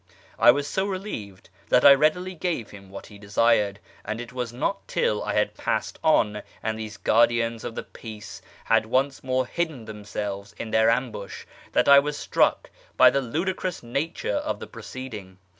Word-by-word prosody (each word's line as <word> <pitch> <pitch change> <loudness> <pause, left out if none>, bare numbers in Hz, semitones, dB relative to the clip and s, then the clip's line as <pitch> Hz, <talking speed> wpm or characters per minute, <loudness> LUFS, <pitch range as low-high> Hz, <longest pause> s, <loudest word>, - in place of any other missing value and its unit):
1 120 - +7
was 145 0 -2
so 190 +5 -1
relieved 150 - -6 0.2
that 125 - +4
1 140 -1 +10
readily 180 +5 +1
gave 165 - -3
him 100 -2 -13
what 100 - -9
he 105 -2 -14
desired; 105 0 +2 0.3
and 110 +2 -4
it 120 +1 -8
was 125 -2 -3
not 125 +11 -3
till 485 +1 0
I - - -2
had - - +1
passed - - -2
on, 105 -9 +3 0.2
and 110 0 -2
these 110 -1 -7
guardians 115 0 +2
of 115 - -6
the - - -4
peace 110 -2 -10 0.2
had 115 -1 +2
once 135 +4 0
more 130 0 0
hidden 155 -5 -3
themselves 105 -1 -6
in 110 - -6
their 110 0 +4
ambush, 115 -4 -2 0.3
that - - +3
I 140 0 +9
was 145 +1 -2
struck - - +1 0.3
by - - +8
the 140 - +1
ludicrous 175 +7 -3
nature 140 - -2
of 300 +1 -3
the - - -7
proceeding. 110 -4 -9
120 Hz, 175 wpm, -25 LUFS, 105-145 Hz, 0.3 s, 1